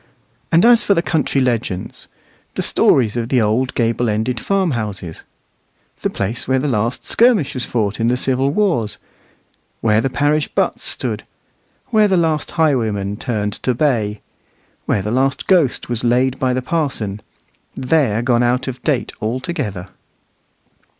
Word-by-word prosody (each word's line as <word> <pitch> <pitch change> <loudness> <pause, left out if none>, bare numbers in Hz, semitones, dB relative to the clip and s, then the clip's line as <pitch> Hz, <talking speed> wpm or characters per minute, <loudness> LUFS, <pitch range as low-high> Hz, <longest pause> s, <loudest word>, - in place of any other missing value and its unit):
And 170 +5 +5
as 240 -1 +6
for 200 - +3
the 170 - +1
country 155 -5 0
legends, 115 -7 -2 0.5
the - - -1
stories 115 -5 +3
of 115 -1 -2
the 130 - +3
old 115 +4 0
gable 115 0 +1
ended 110 +3 -1
farmhouses, 110 - -2 0.8
the - - 0
place 105 +4 -3
where 130 +1 +2
the 135 +3 -1
last 115 -1 -1
skirmish 220 - +3
was 130 -3 -3
fought 105 -3 -1
in 115 - +1
the 125 +1 +2
civil 130 +1 +1
wars, 150 - 0 0.8
where 110 -1 +2
the 135 - 0
parish 145 +4 +1
butts - - -1
stood, - - -3 0.7
where 215 -3 +4
the 190 -2 +2
last 160 -3 0
highwayman 110 -10 +1
turned 105 -3 -2
to 125 - 0
bay, 110 -7 0 0.7
where 100 - +1
the 105 - -3
last 135 +3 0
ghost 170 -9 +2
was 120 -1 -3
laid 125 +2 +2
by 130 -1 +1
the 130 0 -1
parson, 125 - -2 0.5
they're 125 -5 +1
gone 120 -1 +2
out 125 +2 +1
of 130 -1 -5
date 140 -6 -1
altogether. 110 - -3
125 Hz, 150 wpm, -18 LUFS, 110-145 Hz, 0.8 s, as